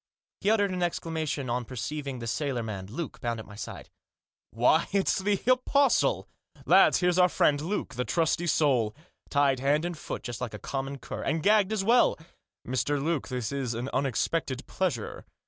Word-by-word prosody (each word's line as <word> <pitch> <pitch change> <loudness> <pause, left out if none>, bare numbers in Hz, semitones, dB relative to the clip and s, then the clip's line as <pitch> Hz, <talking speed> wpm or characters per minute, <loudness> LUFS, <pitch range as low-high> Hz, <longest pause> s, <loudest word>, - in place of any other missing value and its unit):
He 200 - +1
uttered 205 -3 +3
an 180 -1 -3
exclamation 160 -5 -2
on 120 +1 -1
per 130 +2 -10
ceiving 140 +1 -4
the 115 - -6
sailor 125 +1 -1
man, 100 -4 -5
Luke, 140 +8 -6
bound, 120 -1 -2
at 110 - -8
my 105 - -13
side. 105 - -8 0.6
u - - -20
Why, 155 +6 +4
it's 195 -1 +2
the 200 0 +1
Apostle! 255 +3 +3 0.4
Lads, - - +5
here's 180 0 +2
our 180 0 +6
friend, 145 -3 +2
Luke! 185 +7 -3
The 125 0 -1
trusty 170 +3 0
soul! 130 -9 +2 0.3
Tied 140 -2 +2
hand 145 +5 +2
and 175 -1 -3
foot, 155 - -6
just 120 -1 -6
like 120 -4 -4
a - - -5
common 135 +4 -4
cur - - -7
— - - -5
and 160 -1 -1
gagged 210 -1 +4
as 215 -3 0
well! 235 +4 +4 0.5
Mr. 130 +3 0
Luke, 155 0 -1
this 125 -2 -3
is 135 -4 -2
an 120 +4 -3
unexpected 135 +1 -1
pleasure 160 - -3
145 Hz, 190 wpm, -28 LUFS, 125-175 Hz, 0.6 s, our